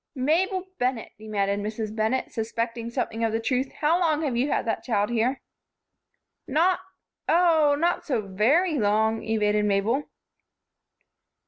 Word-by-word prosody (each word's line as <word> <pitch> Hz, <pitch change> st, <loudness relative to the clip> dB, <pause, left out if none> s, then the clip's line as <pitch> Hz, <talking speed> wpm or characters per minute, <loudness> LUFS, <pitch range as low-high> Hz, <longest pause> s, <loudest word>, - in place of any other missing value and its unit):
"Mabel 360 Hz, +8 st, +1 dB
Bennett!" 250 Hz, -2 st, -1 dB
demanded 200 Hz, -2 st, -1 dB
Mrs. 215 Hz, +1 st, -4 dB
Bennett, 220 Hz, +4 st, 0 dB
suspecting 230 Hz, +1 st, -3 dB
something 235 Hz, -2 st, -3 dB
of 225 Hz, -, +1 dB
the 225 Hz, -, 0 dB
truth, 255 Hz, +3 st, -1 dB
"how 320 Hz, +3 st, +3 dB
long 320 Hz, -3 st, +1 dB
have 270 Hz, -5 st, -1 dB
you 255 Hz, +5 st, +1 dB
had -, -, 0 dB
that 225 Hz, -, -1 dB
child 210 Hz, -3 st, 0 dB
here?" 240 Hz, +3 st, 0 dB, 1.1 s
"Not 335 Hz, +7 st, +2 dB, 0.5 s
Oh, 320 Hz, -4 st, +4 dB
not 340 Hz, +3 st, 0 dB
so 260 Hz, -6 st, -1 dB
very 265 Hz, -, +2 dB
long," 220 Hz, +1 st, +2 dB
evaded 210 Hz, -1 st, +1 dB
Mabel. 210 Hz, +8 st, 0 dB
235 Hz, 135 wpm, -25 LUFS, 220-295 Hz, 1.1 s, Oh